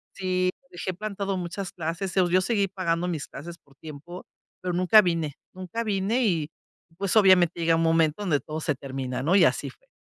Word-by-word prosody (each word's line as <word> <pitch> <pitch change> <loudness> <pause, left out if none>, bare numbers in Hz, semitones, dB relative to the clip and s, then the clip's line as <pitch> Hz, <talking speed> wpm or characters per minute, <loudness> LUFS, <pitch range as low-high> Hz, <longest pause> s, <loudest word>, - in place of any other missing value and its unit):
sí, 185 -1 0
lo 270 - -33
dejé 180 +1 -4
plantado 200 0 -3
muchas 180 +2 -5
clases, 170 +3 -3
o - - -11
sea, - - -2
yo 185 - +6
seguí 200 0 +1
pagando 180 -2 -1
mis 155 -5 -4
clases 170 +5 -9
por 140 -5 -26
tiempo, 155 +4 -10 0.4
pero 180 -1 -2
nunca 185 +5 +6
vine, 165 -6 -1 0.2
nunca 185 +6 -5
vine 210 +4 0
y, 165 -7 0 0.5
pues, 195 +1 -1
obviamente, 180 -4 +5
llega 165 0 +3
un 165 - +1
momento 165 +2 +2
donde 160 -8 +1
todo 155 +4 -6
se 150 - 0
termina, 130 -1 -5
¿no?, 175 +6 +2
y 190 - +6
así - - +1
fue. - - -20
180 Hz, 205 wpm, -26 LUFS, 160-195 Hz, 0.5 s, yo